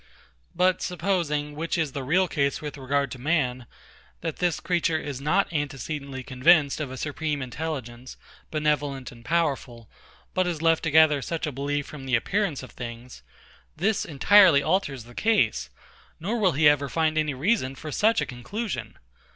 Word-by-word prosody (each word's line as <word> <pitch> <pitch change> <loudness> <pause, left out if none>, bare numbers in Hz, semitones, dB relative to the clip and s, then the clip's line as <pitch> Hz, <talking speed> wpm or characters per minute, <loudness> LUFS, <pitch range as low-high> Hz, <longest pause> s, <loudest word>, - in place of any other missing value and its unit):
But 180 +1 +2
supposing, 170 -5 -1
which 165 +3 -2
is 160 -4 0
the 140 - -4
real 175 +8 +2
case 140 -4 0
with 150 -2 -6
regard 140 0 -1
to 125 - -8
man, 130 -5 0 0.5
that 165 -2 -4
this 175 -2 0
creature 170 -2 0
is 145 -3 -5
not 160 +6 +1
antecedently 140 -2 -4
convinced 140 +3 +3
of 145 - -3
a 130 - -7
supreme 150 +1 -2
intelligence, 130 -3 -6 0.3
benevolent, 145 -4 -1
and 115 -2 -15
powerful, 135 -7 -1 0.5
but 185 -1 +1
is 170 -3 -2
left 165 0 +3
to - - +1
gather 155 -2 +5
such 165 +5 -3
a 150 - -3
belief 145 +2 -2
from 135 -3 -9
the 130 - +3
appearances 175 - -1
of 130 - -10
things; 120 +1 -8 0.6
this 200 +5 +1
entirely 165 +1 +5
alters 155 - 0
the 120 +1 -15
case, 215 - +1 0.5
nor 215 +8 -2
will 190 -5 +3
he 150 +2 +4
ever 145 -1 +3
find 160 0 +1
any 155 -3 0
reason 135 - 0
for 155 +3 -7
such 220 +9 +3
a - - 0
conclusion. 200 - -5
150 Hz, 165 wpm, -26 LUFS, 135-165 Hz, 0.6 s, gather